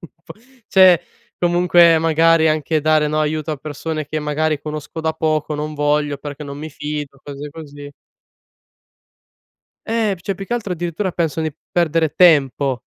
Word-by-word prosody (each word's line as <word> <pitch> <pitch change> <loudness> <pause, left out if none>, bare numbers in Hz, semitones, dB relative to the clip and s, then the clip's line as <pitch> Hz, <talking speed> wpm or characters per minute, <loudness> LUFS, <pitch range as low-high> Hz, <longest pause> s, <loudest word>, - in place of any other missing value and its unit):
un 170 - -10 0.2
po'" - - -11 0.3
Cioè, 185 -3 +6 0.4
comunque 175 -1 +5
magari 165 0 +3
anche 155 0 0
dare, 155 -1 +3
no, 155 +1 0
aiuto 155 +1 -1
a - - -4
persone 155 +2 -5
che 155 +1 -3
magari 150 0 -1
conosco 150 +2 -6
da 160 0 -1
poco 155 -1 -1
"Non 150 +1 -4
voglio 145 -1 0
perché 145 +1 -7
non 140 0 -8
mi 155 +2 -6
fido." 150 -2 -6
Cose 145 +1 -8
così. 145 -2 -10 2.0
Eh, 220 -3 0
p 175 - -17
cioè, 195 +2 -3
più 195 - -7
che - - -5
altro 225 -6 -2
addirittura 175 +3 -3
pensano 165 -2 -2
di 145 - -12 0.2
perdere 165 -2 +1
tempo, 140 -7 +3
155 Hz, 160 wpm, -19 LUFS, 150-165 Hz, 2.0 s, Cioè